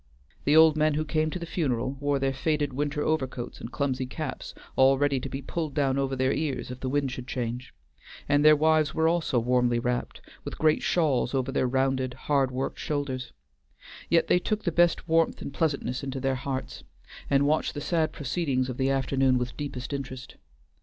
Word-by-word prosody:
The 145 - +4
old 160 -1 +7
men 155 -1 +2
who 155 +1 -1
came 155 0 0
to 170 - -4
the 170 - -6
funeral 130 -8 -1
wore 145 0 +1
their 135 0 0
faded 145 0 -1
winter 145 +2 -1
overcoats 130 -6 -2
and 115 - -7
clumsy 130 -3 -1
caps 145 0 -6 0.2
all 135 +1 +5
ready 140 -1 +1
to - - -6
be 135 0 -5
pulled 155 0 -4
down 140 -2 +1
over 135 -1 -1
their 130 +1 +1
ears 140 -5 -2
if 125 - -7
the 130 - -3
wind 140 -1 0
should 125 0 -7
change; 120 0 -4 0.6
and 145 +1 +3
their 155 0 +8
wives 155 0 +2
were 160 0 +3
also 165 -6 +1
warmly 120 0 +2
wrapped, 120 +1 -2 0.2
with - - -6
great 155 0 +3
shawls 140 -6 +1
over 130 0 0
their 130 - +1
rounded, 130 0 0
hard 135 0 +1
worked 130 +1 -4
shoulders; 140 -4 -3 0.8
yet 170 -1 +4
they 180 - +3
took 215 +3 -2
the 170 - 0
best 175 +1 +2
warmth 165 0 +2
and 140 - -7
pleasantness 140 -4 -1
into 135 -1 -4
their 135 0 0
hearts, 130 +1 -4 0.5
and 140 0 +3
watched 155 +2 +1
the - - -3
sad 160 +1 0
proceedings 135 -3 -1
of 125 - -5
the 135 0 +1
afternoon 135 -1 +2
with 125 0 -3
deepest 140 -2 -5
interest. 135 -2 -6
135 Hz, 195 wpm, -27 LUFS, 130-155 Hz, 0.8 s, their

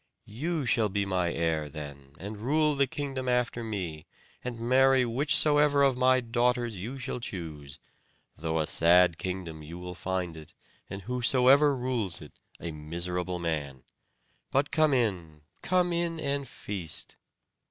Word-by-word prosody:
You 150 +7 -3
shall 115 -2 +2
be 100 0 -1
my 90 -3 0
heir 80 -3 -1
then, 70 -2 -9
and 105 +5 -7
rule 150 +5 +2
the 140 -1 +2
kingdom 135 -3 -4
after 125 -1 0
me, 90 -8 -5 0.4
and 125 -2 -5
marry 130 +2 +4
whichsoever 145 +3 +4
of 135 -2 +4
my 130 0 +4
daughters 120 -1 0
you 120 +9 -5
shall 130 -1 -4
choose; 80 - -6 0.6
though 80 +1 -2
a 80 - +1
sad 85 +1 +4
kingdom 90 -4 -5
you 80 +3 -9
will 90 0 -7
find 90 -2 -3
it, 80 -2 -12 0.3
and 95 0 -7
whosoever 130 +4 +4
rules 120 -8 -1
it - - -14 0.2
a 85 - -5
miserable 85 +4 -3
man. 75 -6 -3 0.7
But 140 +2 +1
come 155 -3 +3
in, 90 -11 -2 0.2
come 180 -1 +1
in, 170 -1 -1
and 140 -2 -2
feast." 95 -8 -4
110 Hz, 145 wpm, -28 LUFS, 85-130 Hz, 0.7 s, marry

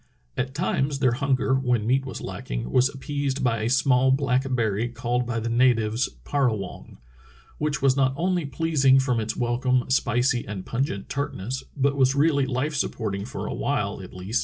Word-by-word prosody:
'* - - -41
At 130 +1 -3
times 145 -4 0
their 130 -3 +3
hunger, 135 +1 +1
when 125 -5 +1
meat 135 +3 +1
was 130 - -6
lacking, - - -5
was 130 +2 +4
appeased 140 0 -3
by 115 -3 +1
a 110 - 0
small 130 0 +3
black 135 -1 +2
berry 110 0 0
called 120 +1 -2
by 120 -2 -1
the 115 - -3
natives 115 -1 +2 0.2
parazvofigy 115 -10 -2 0.6
which 150 -2 -1
was 135 -1 +4
not 135 -1 +2
only 180 +1 0
pleasing 140 -2 +3
from 125 -3 +1
its 110 0 -3
wel 120 0 0
come 130 -1 +2
spicy 125 -1 +2
and 100 -2 -6
pungent 120 -6 -2
tartness, 130 -3 -3
but 140 +1 +2
was 135 0 +3
really 140 -2 +3
life 130 +4 -1
supporting 105 -8 -2
for 135 +4 -6
a - - -3
while 105 -9 -2
at 90 - -10
least. 95 +6 -2
130 Hz, 185 wpm, -25 LUFS, 115-140 Hz, 0.6 s, was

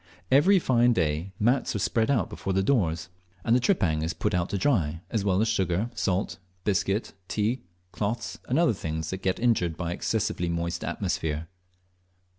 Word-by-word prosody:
Every 175 +9 +6
fine 120 -7 +3
day 80 0 0
mats 120 +3 +2
are - - +2
spread 110 +3 +1 0.2
before 95 - -4
the 95 +1 +2
doors 85 -9 +1 0.4
and 115 - +4
the - - +4
tripang 95 - +2
is 80 +2 -1
put 105 +5 -1
out 90 0 0
to 100 - -1
dry, 85 - +1
as 110 -4 0
well 95 -2 +2
as 110 - +2
sugar, 95 +1 0
salt, 95 -3 -1 0.2
biscuit, 100 +1 0
tea, 110 +5 0 0.3
cloths, 110 +3 -3
and 130 - +2
other 165 -7 +4
things 80 -4 -4
that 95 0 -4
get 95 -1 0
injured 95 -9 +1
by 85 -1 -2
an - - -3
excessively 100 -5 -1
moist 85 0 -2
atmosphere. 80 +1 -2
95 Hz, 175 wpm, -27 LUFS, 85-115 Hz, 0.4 s, Every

